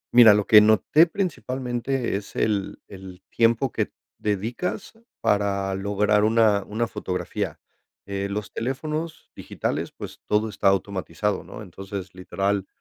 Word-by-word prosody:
Mira, 110 Hz, -4 st, +9 dB
lo 105 Hz, -, +1 dB
que 105 Hz, -1 st, +8 dB
noté 110 Hz, -, +5 dB
principalmente 130 Hz, -, -2 dB
es 100 Hz, 0 st, -6 dB
el, 100 Hz, -3 st, -1 dB
el 95 Hz, -1 st, -11 dB
tiempo 115 Hz, +2 st, +2 dB
que -, -, -1 dB
t -, -, -39 dB, 0.3 s
dedicas 110 Hz, -, -3 dB, 0.3 s
para 100 Hz, -1 st, +1 dB
lograr 105 Hz, +2 st, +1 dB
una 110 Hz, -2 st, +3 dB
una 110 Hz, +3 st, -1 dB
fotografía, 90 Hz, -4 st, -4 dB, 0.5 s
eh, 100 Hz, 0 st, -2 dB
los 100 Hz, 0 st, -4 dB
teléfonos 155 Hz, +6 st, -4 dB
digitales, -, -, -3 dB
pues -, -, -9 dB
todo 105 Hz, +1 st, +1 dB
está 100 Hz, -, -1 dB
automatizado, 95 Hz, 0 st, -1 dB
¿no? 110 Hz, -, -9 dB
Entonces, 95 Hz, 0 st, -8 dB
literal, 95 Hz, +1 st, -2 dB
105 Hz, 130 wpm, -24 LUFS, 100-115 Hz, 0.5 s, Mira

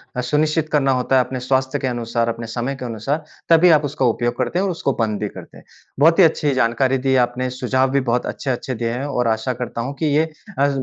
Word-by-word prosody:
अ, 125 Hz, -, -1 dB
सुनिश्चित 155 Hz, +4 st, 0 dB
करना 135 Hz, -3 st, +2 dB
होता 130 Hz, +1 st, +1 dB
है 125 Hz, -, +3 dB
अपने 130 Hz, -, -5 dB
स्वास्थ्य 130 Hz, +2 st, 0 dB
के 130 Hz, -, -2 dB
अनुसार 115 Hz, -1 st, -1 dB
अपने 115 Hz, 0 st, -5 dB
समय 120 Hz, +4 st, -3 dB
के 130 Hz, -2 st, -7 dB
अनुसार 130 Hz, +7 st, -3 dB, 0.3 s
तभी 165 Hz, +2 st, +6 dB
आप 145 Hz, -, -4 dB
उसका 140 Hz, -1 st, -1 dB
उपयोग 120 Hz, 0 st, 0 dB
करते 130 Hz, +8 st, -1 dB
हैं -, -, +1 dB
और 200 Hz, -, 0 dB
उसको 150 Hz, -5 st, -1 dB
बंद 110 Hz, -2 st, 0 dB
भी 105 Hz, -, -2 dB
करते -, -, -12 dB
हैं। -, -, -15 dB, 0.4 s
बहुत 165 Hz, +4 st, +5 dB
ही 185 Hz, -, +9 dB
अच्छी 150 Hz, -3 st, +2 dB
जानकारी 130 Hz, +2 st, +1 dB
दी 130 Hz, +1 st, 0 dB
है -, -, +4 dB
आपने, 125 Hz, +1 st, 0 dB
सुझाव 130 Hz, +1 st, 0 dB
भी 140 Hz, -, +2 dB
बहुत 125 Hz, -1 st, 0 dB
अच्छे-अच्छे 130 Hz, -1 st, -3 dB
दिए 115 Hz, 0 st, -2 dB
हैं 125 Hz, +4 st, -3 dB
और 125 Hz, -4 st, -1 dB
आशा 110 Hz, +3 st, 0 dB
करता 120 Hz, -1 st, -5 dB
हूँ 130 Hz, +4 st, -4 dB
कि 160 Hz, -, 0 dB
ये 155 Hz, -, +4 dB, 0.4 s
अ, 140 Hz, -, +4 dB
130 Hz, 250 wpm, -20 LUFS, 120-140 Hz, 0.4 s, ही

